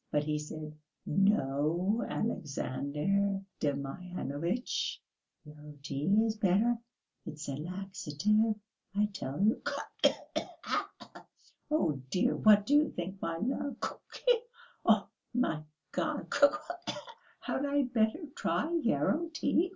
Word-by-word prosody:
But 150 - +1
he 150 0 0
said, 150 0 -6 0.3
'No, 180 - +2
Alexandr 195 - 0 0.2
Demyanovitch, 150 - -2 0.5
yarrow 150 0 -12
tea 140 +1 -3 0.2
is 220 -1 0
better, 215 +4 +3 0.5
it's 155 -1 -6
a 140 - -2
laxative, 190 +5 0 0.4
I 210 +1 +4
tell 135 -5 -4
you'... 215 +2 +3
Khee - - +1 0.2
khee. - - 0 1.3
Oh, 160 - +1
dear! 185 - +2
What 210 -1 +6
do 285 - +1
you 295 +1 +6
think, 190 +2 -5
my 165 0 -1
love? 265 +8 -1
Khee! - - 0 0.4
Oh, - - +4 0.3
my 165 -11 +1 0.3
God! - - -2
Khee 285 0 +7
khee! 320 +4 -6 0.5
Had 280 +2 -1
I 285 0 +3
better 245 +5 +1
try 325 +3 0
yarrow 310 +6 +1
tea?... 325 +2 +2
195 Hz, 115 wpm, -32 LUFS, 150-240 Hz, 1.3 s, Khee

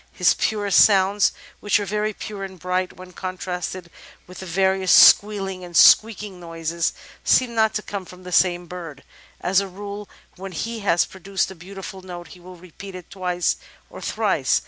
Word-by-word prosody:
His 180 - +3
purest 205 -3 +3
sounds, 200 0 +3 0.3
which 205 0 +2
are 205 - -3
very 210 +2 -1
pure 205 -1 -7
and 190 -1 -8
bright, 180 +1 -2
when 185 0 -11
contrasted 185 -1 -5 0.3
with 180 - -12
various 190 +1 +1
squealing 195 -3 +5
and 175 -1 -3
squeaking 210 -4 +5
noises, 165 -1 -3 0.3
seem 250 -2 +3
not 220 -1 +2
to 210 - -2
come 200 -2 -6
from 180 +1 -14
the 180 - -9
same 175 -1 +2
bird.. 170 -4 -8
• - - -16
• - - -23 0.4
As 185 +1 +3
a 200 - -3
rule, 200 +2 -8 0.3
when 190 0 -8
he 230 +7 -4
has 175 -5 +2
pro 190 - -14
duced 195 +1 -1
a - - -7
beautiful 190 +2 -9
note 175 -2 -9
he 180 - -13
will 180 +1 -12
repeat 185 +2 -11
it 180 -2 -11
twice 180 -2 -1 0.3
or - - -10
thrice." - - +1
185 Hz, 185 wpm, -22 LUFS, 180-200 Hz, 0.4 s, squealing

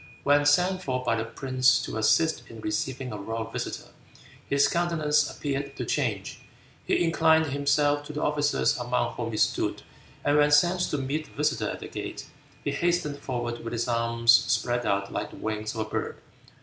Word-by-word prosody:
When 145 +1 +4
sent 180 +5 +3
for 130 -7 -2
by 115 - +1
the 115 0 -2
prince 130 +2 +2
to - - -5
assist 160 +9 +2
in 115 - -10
receiving 125 +5 -3
a 105 - -5
royal 110 +3 -3
visitor, - - -5 0.6
his 140 0 +4
countenance 155 -4 +1
appeared 140 -1 -4
to 125 - -4
change. 115 -7 -2 0.5
He - - +2
inclined 160 -1 +4
himself 145 +1 +2
to 150 - -7
the 150 - -3
officers 145 -1 +1
among 120 0 -1
whom 115 -1 -4
he 110 - -4
stood, - - 0 0.4
and 145 +1 +3
when 145 0 +5
sent 175 +5 +4
to 150 - -1
meet 140 +3 -2
the - - -19
visitor 150 +1 0
at - - -6
the - - -6
gate, - - -6 0.4
"he - - -1
hastened 170 -5 0
forward 120 -3 -4
with 115 - -5
his 120 +1 -1
arms 115 0 +3
spread 120 +1 +2
out 100 0 -1
like - - -3
the - - -13
wings 110 0 -3
of 110 - -2
a - - -1
bird." - - -3
135 Hz, 190 wpm, -27 LUFS, 115-150 Hz, 0.6 s, when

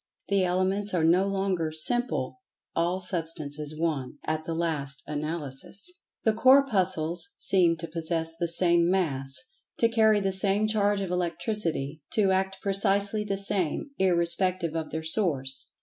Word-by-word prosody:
The 200 -1 +2
Elements 185 +2 0
are 165 - +1
no 180 +4 +3
longer 190 -5 -1
"Simple." 240 - 0 0.3
All 175 +3 0
Substance 160 -5 -4
is 150 +1 -7
One, 145 -5 -2
at 155 0 -3
the 165 - -4
last 150 -5 -3
analysis! 150 - -5 0.3
The 220 - +2
Corpuscles 215 - +2
seem 175 -3 +3
to 165 +1 -6
possess 165 0 0
the 170 +1 -2
same 170 0 +3
Mass—to 180 - -1
carry 220 -2 +3
the 195 -1 -1
same 195 +2 +5
charge 205 -2 +1
of 190 -2 -4
Electricity—to 175 -1 -1
act 190 0 -1
precisely 200 +1 +2
the 200 -2 -3
same—irrespective 185 - 0
of 160 -1 -3
their 160 0 -5
source. 150 -7 +1
180 Hz, 135 wpm, -26 LUFS, 160-200 Hz, 0.3 s, same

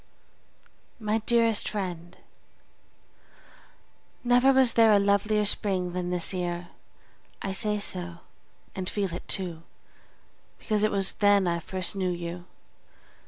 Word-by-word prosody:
MY 215 0 -1
DEAREST 230 -2 +2
FRIEND, 175 -4 -6 2.1
Never 245 +2 +4
was 260 -3 +4
there 225 -1 +5
a 205 - +6
lovelier 200 +1 +1
spring 190 -3 +1
than 180 -1 -3
this 180 +1 +2
year; 175 -1 -4 0.7
I 195 - -3
say 210 +2 0
so, 175 -4 -2 0.5
and 185 -1 -4
feel 195 -4 -3
it 175 - -8
too, 175 -5 -1 1.0
because 215 -2 0
it 215 - +3
was 195 -2 +3
then 205 -2 +3
I 170 0 -1
first 185 +2 -3
knew 190 -2 -1
you. 175 0 -6
195 Hz, 120 wpm, -26 LUFS, 180-210 Hz, 2.1 s, a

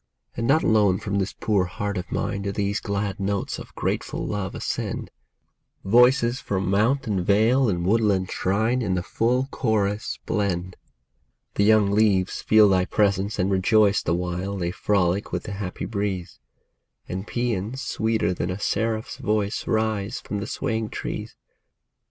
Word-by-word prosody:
And 115 - -2
not 155 +4 +4
alone 105 -4 +4
from 100 +1 -2
this 95 +1 -2
poor 105 -5 +2
heart 100 +3 -4
of 90 -2 -5
mine 100 -1 -2
Do 100 0 -2
these 100 +1 -1
glad 100 -1 -3
notes 100 0 -2
of - - -11
grateful - - -2
love 100 -2 -3
ascend; - - -3 0.7
Voices 125 +3 +4
from 95 -1 -1
mount 115 +8 +2
and 100 -5 -1
vale 115 +6 +3
and 85 -3 -1
woodland 100 -3 +2
shrine 110 +7 +1
In 95 -5 0
the 90 - -1
full 120 +7 0
chorus 105 -2 -1
blend. 95 -3 -1 0.8
The 100 - +2
young 105 -2 +4
leaves 100 -3 +2
feel 110 -1 +6
thy 95 -2 +3
presence 100 0 +1
and 95 +2 +1
rejoice 100 +2 +3
The 85 - 0
while 90 +3 -3
they 85 -2 -1
frolic 95 0 0
with - - -2
the - - -6
happy 100 -2 -5
breeze; 100 -4 -3 0.7
And 95 +3 -5
paeans 120 0 -2
sweeter 110 -3 0
than 90 - -3
a 95 +2 -3
seraph's 110 +2 -1
voice 105 0 -1
Rise 110 -3 0
from 105 - -5
the 100 - -4
swaying 110 -4 -2
trees. - - -5
100 Hz, 155 wpm, -24 LUFS, 95-110 Hz, 0.8 s, feel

